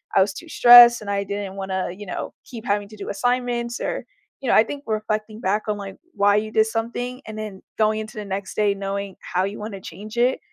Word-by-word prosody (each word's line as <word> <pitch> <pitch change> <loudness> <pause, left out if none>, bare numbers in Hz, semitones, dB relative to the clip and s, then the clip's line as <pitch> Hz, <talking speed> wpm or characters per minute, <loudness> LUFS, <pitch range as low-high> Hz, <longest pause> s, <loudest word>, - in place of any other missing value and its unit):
I 195 - +6
was 195 +1 +2
too 335 - -10
stressed 240 -2 +9
and 205 - -7
I 200 0 0
didn't 200 -1 -5
wanna, 190 -2 -3
you 205 +3 -9
know, 180 - -5
keep 235 -3 -9
having 205 0 0
to 215 - -12
do 200 - -6
assignments," 245 +2 -1
or, - - -3 0.4
you 265 - -2
know - - +5
I 215 - +7
think 285 +5 -7
reflecting 215 0 -2
back 205 +3 0
on, 210 - -1
like, 195 -1 -8 0.2
why 205 0 +3
you 215 +1 -2
did 220 0 +4
something, 240 +3 -3
and 215 0 -7
then 210 -3 -6 0.2
going 215 0 +2
into 215 +1 -8
the 210 - -5
next 195 0 -5
day 205 -1 +2
knowing 200 0 -4
how 180 +1 -1
you 205 +2 -5
wanna 205 -2 -6
change 215 +5 -9
it 250 +2 +2
215 Hz, 235 wpm, -23 LUFS, 200-230 Hz, 0.4 s, stressed